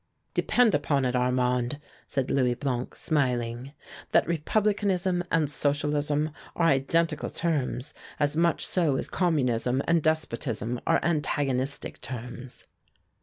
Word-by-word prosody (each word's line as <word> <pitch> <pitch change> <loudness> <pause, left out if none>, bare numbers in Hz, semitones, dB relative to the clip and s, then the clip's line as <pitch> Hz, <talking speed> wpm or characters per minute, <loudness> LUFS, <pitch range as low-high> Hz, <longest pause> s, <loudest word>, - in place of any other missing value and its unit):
"Depend 245 -4 +3
upon 145 -2 +1
it, 125 0 0
Armand," 125 +1 +1 0.3
said 135 -2 -1
Louis 125 -3 +2
Blanc, 125 -2 -3
smiling, 125 -3 -1 0.4
"that - - +4
Republicanism 190 +1 +1
and 160 -2 +2
Socialism 145 +1 0 0.2
are 170 - +2
identical 165 +2 +2
terms, 145 -5 -2 0.3
as 145 0 +1
much 170 +1 +2
so 165 -7 +2
as - - -2
Communism 130 -7 +1
and 170 -1 +3
despotism 125 -7 -1
are 165 - +4
antagonistic 145 -4 -1
terms." 125 0 -8
145 Hz, 115 wpm, -27 LUFS, 125-165 Hz, 0.4 s, that